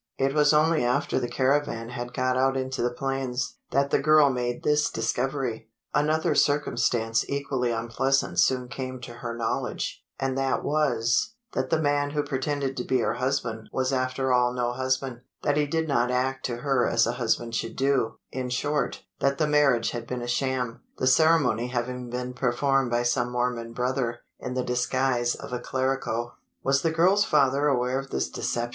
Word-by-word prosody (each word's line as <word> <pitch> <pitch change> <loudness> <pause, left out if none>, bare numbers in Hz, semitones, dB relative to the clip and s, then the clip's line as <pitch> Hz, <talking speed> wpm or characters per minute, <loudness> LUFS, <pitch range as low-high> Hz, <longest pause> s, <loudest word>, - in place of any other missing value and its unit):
It 135 0 +1
was 150 0 +4
only 155 -1 +3
after 125 +4 +1
the 125 - -2
caravan 130 -3 0
had 120 -1 -5
got 130 0 0
out 135 +1 +2
into 130 0 -2
the 120 - +2
plains, 125 0 -3
that 140 +1 +1
the - - +3
girl 155 -1 +5
made 120 -1 -2
this 150 0 +2
discovery. 125 0 -2 0.2
Another 155 +2 +2
circumstance 120 -6 +1
equally 140 -3 -1
unpleasant 120 +4 0
soon 125 -1 +3
came 130 0 -5
to 120 -1 -8
her 115 -1 -4
knowledge; 115 -1 -2 0.2
and 135 -1 -1
that 135 -1 0
was: 125 - +1 0.2
that - - -1
the 160 - +2
man 145 -1 +1
who 145 0 -1
pretended 140 -1 -2
to 125 - -1
be 130 - +1
her 110 - +1
husband 125 -3 -2
was 130 +1 0
after 130 0 0
all 125 0 +3
no 120 -1 -1
husband 130 -1 -2 0.2
that 145 - +2
he 150 0 +2
did 160 +2 -1
not 125 -4 +2
act 130 +1 0
to 120 -2 -4
her 130 -1 +1
as 115 0 +3
a 115 - 0
husband 115 0 0
should 115 0 -3
do 135 -4 +1 0.2
in 130 -1 -3
short, 145 +4 -1 0.2
that 140 0 +1
the 155 - +2
marriage 145 -6 +3
had 120 -1 -5
been 125 -1 -4
a - - -5
sham 125 -1 -1 0.2
the - - -1
ceremony 130 -4 +4
having 125 0 -3
been 125 +1 -4
performed 130 +1 +1
by 120 0 +1
some 120 0 +1
Mormon 120 -1 -1
brother, 125 -1 -1 0.2
in 125 - -5
the 130 - 0
disguise 125 0 0
of - - -9
a 125 - -1
clerico!" 130 -2 -2 0.3
"Was 140 +1 +2
the 165 - +2
girl's 180 +6 +4
father 145 -5 +3
aware 125 -1 +1
of 135 - -7
this 65 - -2
deception!" 120 0 -2
130 Hz, 185 wpm, -26 LUFS, 120-140 Hz, 0.3 s, girl